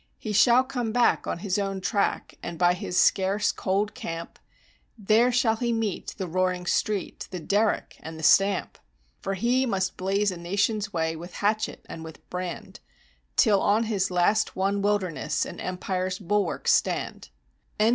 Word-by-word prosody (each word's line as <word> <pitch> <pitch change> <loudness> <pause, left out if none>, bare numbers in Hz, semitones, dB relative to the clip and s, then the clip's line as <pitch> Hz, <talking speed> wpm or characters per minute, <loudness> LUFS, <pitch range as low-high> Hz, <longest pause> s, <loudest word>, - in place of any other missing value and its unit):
"He 215 - -5
shall 240 +4 +6
come 250 -4 -3
back 240 +1 +2
on - - -2
his 195 0 0
own 195 -1 -2
track, 200 +2 -1
and 170 - -6
by 175 0 +4
his 180 -1 -4
scarce 200 +2 +3
cool 195 +2 0
camp, 185 -7 -7 0.6
There 220 +4 +3
shall 235 -2 +2
he 235 0 -1
meet 225 -4 -2
the 190 - -3
roaring 180 +1 -1
street, 205 +1 -1
the 180 - -5
derrick 205 +5 0
and 160 +1 -8
the 160 - -8
stamp; 195 +4 +3 0.4
For 195 - -3
he 245 +6 +1
must 190 -4 -1
blaze 195 +2 +1
a 180 - -6
nation's 200 +4 -1
way 160 -2 -1
with 175 +2 -9
hatchet 215 +2 -1
and 160 - -8
with 160 -1 -12
brand, 180 -1 -5 0.6
Till 205 -5 +4
on 215 +3 +3
his 205 -4 0
last 185 +4 +2
won 200 +1 0
wilderness 200 -5 0
an - - -8
empire's 185 0 -2
bulwarks 200 -1 +1
stand." - - -1
195 Hz, 160 wpm, -26 LUFS, 180-215 Hz, 0.6 s, shall